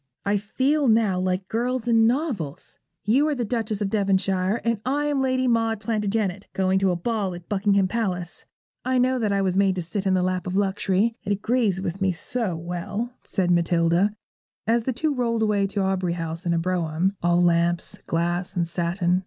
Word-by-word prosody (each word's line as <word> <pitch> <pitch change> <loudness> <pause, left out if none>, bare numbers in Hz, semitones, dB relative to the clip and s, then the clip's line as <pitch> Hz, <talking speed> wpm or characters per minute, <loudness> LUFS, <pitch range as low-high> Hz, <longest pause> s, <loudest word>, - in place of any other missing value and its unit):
'I 200 +1 +2
feel 270 +8 +1
now 220 -5 +3
like 185 0 -1
girls 245 +1 -1
in 225 -1 +5
novels. 235 - -2 0.3
You 260 +9 +3
are 300 - 0
the 245 -3 -2
Duchess 220 -2 -2
of 195 -1 -1
Devonshire 195 0 +1
and 230 -3 0
I 285 +3 0
am 290 -2 +1
Lady 260 -1 +1
Maud 225 -2 +1
Plantagenet, 210 -2 -1
going 190 0 +2
to 195 0 +2
a 180 - +1
ball 195 0 -2
at 175 -1 -11
Buckingham 200 -1 +2
Palace. 185 -5 -3 0.4
I 255 0 +1
know 255 +1 +2
that 215 -3 0
I 200 0 +1
was 185 -1 0
made 195 -1 +3
to 180 - -2
sit 195 +3 -3
in 190 - +3
the 180 - +2
lap 185 0 -1
of 185 +1 -1
luxury: 200 +2 +1
it 205 - -3
agrees 210 -2 +1
with 190 +1 -4
me 190 -1 +3
so 215 +1 -2
well,' 180 +8 -4
said 180 -3 0
Matilda, 170 +3 +3 0.5
as 230 +1 +1
the 260 - +1
two 310 +5 0
rolled 230 -3 0
away 205 -2 +2
to 200 +1 -2
Aubrey 185 -2 0
House 165 +1 -5
in 170 - +2
a - - +1
brougham, 175 +1 0
all 175 0 +3
lamps, 170 0 +1
glass, 175 +2 -1
and 170 -2 0
satin. 175 +1 0
195 Hz, 195 wpm, -24 LUFS, 180-230 Hz, 0.5 s, in